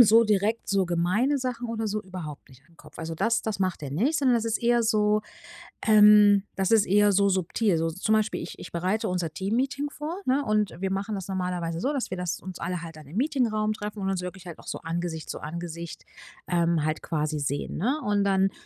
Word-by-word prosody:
so 230 0 +7
direkt 210 +2 +1
so 195 -1 +2
gemeine 185 +11 +1
Sachen 245 -2 -3
oder 225 -1 -2
so 215 0 -2
überhaupt 175 -7 -8
nicht 130 0 -18
an - - -25
'n - - -25
Kopf. - - -16
Also 165 0 -4
das 225 +7 +1
das 220 -3 -3
macht 185 -4 -1
er 140 - -5
nicht, 245 - +1
sondern 260 -3 +3
das 230 -1 +1
ist 230 -1 0
eher 240 0 +3
so 215 -1 +2 0.7
ähm, 210 -2 +7
das 190 -1 0
ist 220 -2 +6
eher 205 +1 +4
so 200 +1 +4
subtil, 185 +1 +1
so 165 +1 0
zum 190 +6 0
Beispiel 215 0 0
ich 170 - -8
ich - - -9
bereite 185 +6 0
unser 180 -3 -2
Teammeeting 260 - -1
vor, 310 +6 -5
ne? 270 +3 +2
Und 215 -3 +1
wir 190 +1 -2
machen 200 +2 -2
das 190 -2 -5
normalerweise 180 -3 -2
so, 270 +9 0
dass 275 -4 -2
wir 185 - -4
das 180 -1 -3
uns 185 -1 -8
alle 180 0 -3
halt 165 -1 -9
dann 155 -3 -12
im 155 - -10
Meetingraum 230 -5 +1
treffen 210 0 -6
und 195 0 -1
uns 190 -2 -1
wirklich 180 0 -7
auch - - -15
so - - -4
Angesicht 165 -1 -4
zu - - -5
Angesicht, 170 0 -6 0.4
ähm, 170 -3 +2
halt 155 0 -1
quasi 155 -1 -1
sehen, 140 0 -2
ne? 260 - 0
Und 205 -2 +2
dann 195 0 +3
195 Hz, 225 wpm, -26 LUFS, 170-220 Hz, 0.7 s, so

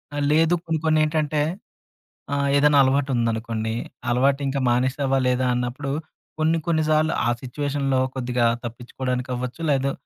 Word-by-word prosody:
ఆహ్, 145 - -1
లేదు. 165 +3 +4 0.2
ఇంకొన్నేంటంటే 155 -1 +1 0.9
ఆహ్, 140 0 +1
ఏదైనా 145 0 +5
అలవాటు 135 +1 +1
ఉందనుకోండి. 115 -1 -1 0.4
అలవాటు 135 +3 +2
ఇంకా 135 0 -1
మానేశావా 130 +2 +1
లేదా 125 0 +1
అన్నప్పుడు, 125 +3 -3 0.5
కొన్ని 160 +1 +2
కొన్ని 160 -2 +2
సార్లు 155 +1 +3
ఆ - - +3
సిట్యుయేషన్‌‌‌లో 135 0 -1 0.2
కొద్దిగా 125 -1 0 0.2
తప్పించుకోవడానికి 125 +2 -4
అవ్వచ్చు. 125 +5 -5
లేదు 135 0 +1
135 Hz, 125 wpm, -23 LUFS, 125-150 Hz, 0.9 s, ఏదైనా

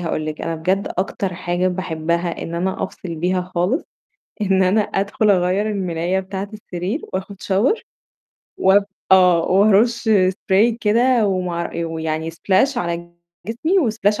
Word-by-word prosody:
هاقول 160 -2 -2
لِك، 155 0 -5
أنا 165 - -2
بجد 185 +5 -1
أكتر 190 -1 -2
حاجة 180 +1 -1
باحبّها 170 -1 -2
إن 165 - -5
أنا 185 +3 -2
أفصل 180 -3 -6
بيها 180 +3 0
خالص، 185 - 0 0.6
إن 190 -2 +3
أنا 190 +4 +3
أدخُل 200 +1 0
أغيّر 190 +2 +2
المِلاية 185 -2 -1
بتاعة 190 +1 -5
السرير 200 - -4
وآخُد 190 +2 -4
shower 210 - +1 0.8
وب 195 +2 +4 0.3
آه. 180 -2 +6
وأرُش 215 +5 +3 0.2
spray 210 +4 +1
كده 235 +1 +3
ومع 180 -3 -2
ويعني 160 -1 -3
splash 190 - +1
على 170 -5 -3 0.3
جسمي 295 - +1
وsplash 210 -1 0
190 Hz, 135 wpm, -20 LUFS, 170-210 Hz, 0.8 s, آه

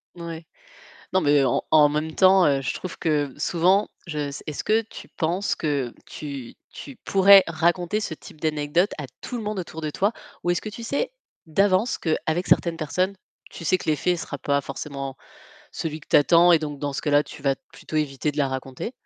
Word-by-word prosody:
N 175 - -10
ouais. 165 -1 -7 0.7
Non 190 - +3
mais 145 -2 +4
en 120 - +1
en 150 -2 +7
même 155 +2 -2
temps, 190 -1 +6
heu, 140 -2 +2
je 130 - -2
trouve 185 - -7
que 145 -4 0
souvent, 185 +4 +2 0.2
je 155 -3 -4
s 145 -1 -4
est-ce 150 - -4
que 220 +1 +3
tu 225 - -12
penses 175 +5 -1
que 140 -6 -2
tu 140 -5 -7 0.2
tu 140 - -10
pourrais 195 0 +7
raconter 175 +5 0
ce 190 - -3
type 155 0 -14
d'anecdote 155 +4 +1
à 150 - -5 0.2
tout 245 - -5
le 225 - -5
monde 210 -1 -3
autour 165 -2 -7
de 155 - -2
toi, 195 +7 +1 0.3
ou 175 - 0
est-ce 175 - 0
que - - -7
tu 230 +2 -9
sais 280 - -1 0.3
d'avance 195 +7 +2
qu'avec 160 +1 -1
certaines 170 -1 +3
personnes, 180 +5 -1 0.3
tu - - -10
sais 185 +3 +3
que 175 - -4
l'effet 165 +4 +1
sera 150 -3 -6
pas 140 +1 +1
forcément 135 -1 -6 0.6
celui 155 -1 -4
que - - -19
tu - - +4
attends 170 +4 +6
et 165 - +5
donc 145 -2 -5
dans 145 0 -3
ce - - -3
cas-là, 145 -1 +3
tu 150 - -12
vas 135 -1 +2
t - - -41
plutôt 155 - -5
éviter 150 0 -1
de 145 - -13
la 140 -2 +2
raconter? 130 - -5
160 Hz, 210 wpm, -24 LUFS, 145-185 Hz, 0.7 s, en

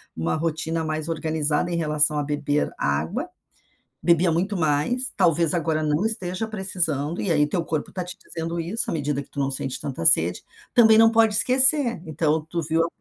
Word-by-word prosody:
uma 80 +1 -1
rotina 160 0 -2
mais 155 +1 -3
organizada 155 +1 -1
em 170 - -1
relação 150 -1 +1
a - - -1
"beber 145 0 -1
água", 70 +3 -2 0.7
bebia 170 0 +3
muito 190 +4 -1
mais, 160 - 0
talvez 170 -3 +2
agora 160 -2 -1
não 150 +5 0
esteja 215 -1 -3
precisando 175 -7 -2
e 190 - -1
aí 150 -2 +3
teu 170 +2 -2
corpo 155 -2 -3
está 185 - -4
te 180 +3 -9
dizendo 165 +1 -6
isso, 180 +8 -2
à - - -2
medida 145 -2 -2
que - - -15
tu 140 - -8
não 135 0 0
sente 130 -1 -4
tanta 135 - -5
sede, 85 +2 +5 0.3
também 220 -2 +6
não 225 0 +6
pode 225 -2 +3
esquecer, 255 - +3
então 155 0 0
tu 170 - -3
viu 160 +2 0
a - - -1
165 Hz, 190 wpm, -23 LUFS, 150-185 Hz, 0.7 s, também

